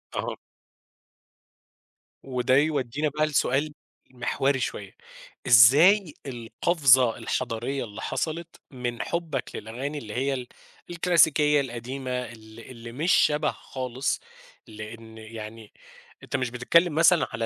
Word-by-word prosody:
أها. -, -, -3 dB, 1.9 s
وده 130 Hz, -1 st, +1 dB
يودينا 150 Hz, -1 st, 0 dB
بقى 150 Hz, +2 st, 0 dB
لسؤال 145 Hz, 0 st, 0 dB, 0.4 s
مِحوري 135 Hz, +2 st, 0 dB
شويّة، 100 Hz, -5 st, -5 dB, 0.5 s
إزاي 150 Hz, -, +6 dB
القفزة 125 Hz, 0 st, +2 dB
الحضارية 130 Hz, +2 st, -3 dB
اللي 110 Hz, -1 st, -9 dB
حصلت، 165 Hz, +6 st, -3 dB, 0.2 s
من 125 Hz, -3 st, -4 dB
حبك 170 Hz, -4 st, -3 dB
للأغاني 130 Hz, +7 st, -5 dB
اللي 110 Hz, -7 st, -7 dB
هي 135 Hz, +4 st, 0 dB
ال 125 Hz, -2 st, -5 dB, 0.4 s
الكلاسيكية 160 Hz, -4 st, +3 dB
القديمة 130 Hz, +1 st, -6 dB
ال 115 Hz, -3 st, -6 dB
اللي 115 Hz, -1 st, -10 dB
مش 155 Hz, +9 st, 0 dB
شبه 150 Hz, +1 st, +3 dB
خالص، 130 Hz, +1 st, -4 dB, 0.5 s
لأن 110 Hz, +1 st, -10 dB
يعني، 110 Hz, 0 st, -10 dB, 0.5 s
أنت -, -, -5 dB
مش 130 Hz, -2 st, -1 dB
بتتكلّم 150 Hz, +7 st, +2 dB
مثلًا 170 Hz, +1 st, +4 dB
على 115 Hz, 0 st, -2 dB
130 Hz, 110 wpm, -26 LUFS, 115-150 Hz, 1.9 s, إزاي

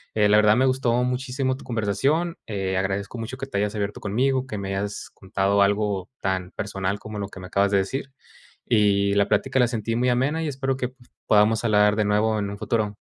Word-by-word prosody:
Eh, 105 Hz, -1 st, +3 dB
la 105 Hz, -, +6 dB
verdad, 105 Hz, 0 st, +5 dB
me 130 Hz, -, +4 dB
gustó 130 Hz, -2 st, +1 dB
muchísimo 130 Hz, +1 st, -1 dB
tu -, -, -13 dB
conversación, 135 Hz, -, 0 dB
eh, 95 Hz, -3 st, -2 dB
agradezco 100 Hz, +4 st, -2 dB
mucho 115 Hz, +3 st, -5 dB
que 135 Hz, -, -6 dB
te 100 Hz, -, -4 dB
hayas 105 Hz, +1 st, -1 dB
abierto 105 Hz, 0 st, -3 dB
conmigo, 130 Hz, +5 st, 0 dB
que 105 Hz, -, -5 dB
me 95 Hz, 0 st, -4 dB
hayas 100 Hz, +1 st, -4 dB
contado 100 Hz, +1 st, 0 dB
algo 100 Hz, -2 st, 0 dB
tan 95 Hz, -1 st, -2 dB
personal 100 Hz, -1 st, -3 dB
como 110 Hz, -1 st, -8 dB
lo 100 Hz, 0 st, -4 dB
que 95 Hz, -, -11 dB
me 90 Hz, -, -8 dB
acabas 100 Hz, +1 st, +1 dB
de 100 Hz, -, +4 dB
decir. 135 Hz, +7 st, -3 dB, 0.5 s
Y 100 Hz, -3 st, +3 dB
la 100 Hz, 0 st, +3 dB
plática 135 Hz, 0 st, +1 dB
la 125 Hz, -, +5 dB
sentí 115 Hz, -1 st, -2 dB
muy 125 Hz, +1 st, +2 dB
amena, 140 Hz, +7 st, +1 dB
y -, -, -2 dB
espero 135 Hz, -1 st, -2 dB
que, 125 Hz, -2 st, -2 dB
pues, 125 Hz, -1 st, -23 dB, 0.2 s
podamos 110 Hz, +1 st, +4 dB
hablar 105 Hz, -1 st, +4 dB
de 105 Hz, 0 st, +1 dB
nuevo 105 Hz, +1 st, +2 dB
en 100 Hz, -1 st, -2 dB
un 100 Hz, -, -7 dB
futuro. 110 Hz, -2 st, -1 dB
105 Hz, 220 wpm, -24 LUFS, 100-125 Hz, 0.5 s, la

